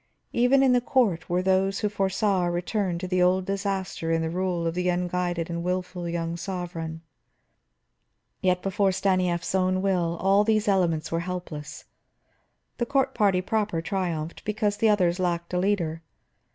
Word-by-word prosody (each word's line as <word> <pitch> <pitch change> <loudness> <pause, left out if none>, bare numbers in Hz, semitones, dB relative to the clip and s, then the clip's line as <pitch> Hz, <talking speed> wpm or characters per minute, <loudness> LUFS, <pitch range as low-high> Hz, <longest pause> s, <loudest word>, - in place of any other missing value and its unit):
Even 255 +3 +4
in 260 -2 +5
the 245 - +3
court 220 -10 +1
were 180 +1 +1
those 190 +1 +1
who 210 - +2
foresaw 195 -1 +1
a - - 0
return 180 +1 -1
to 185 +1 -1
old 185 +1 +3
disaster 195 -4 -2
in 165 0 +1
the 160 - -2
rule 180 -1 -1
of 165 - 0
the 180 +1 0
unguided 175 -1 -1
and 170 -1 -3
wilful 180 -1 -3
young 170 0 -2
sovereign. 170 -3 -5 1.4
Yet 180 -1 +1
before 195 0 +1
Stanief's 185 -3 0
own 185 0 +2
will 175 -3 +1
all 195 +2 +4
these 215 -1 +1
elements 170 -5 +1
were 165 - 0
helpless. 170 -4 -6 0.9
The 240 - 0
court 270 0 +1
party 195 -3 +2
proper 210 -4 0
triumphed, 170 -3 -3
because 210 -1 -1
the 225 - +3
others 180 -4 +2
lacked 170 -1 -1
a 180 - +2
leader. 175 -5 0
185 Hz, 160 wpm, -26 LUFS, 170-200 Hz, 1.4 s, in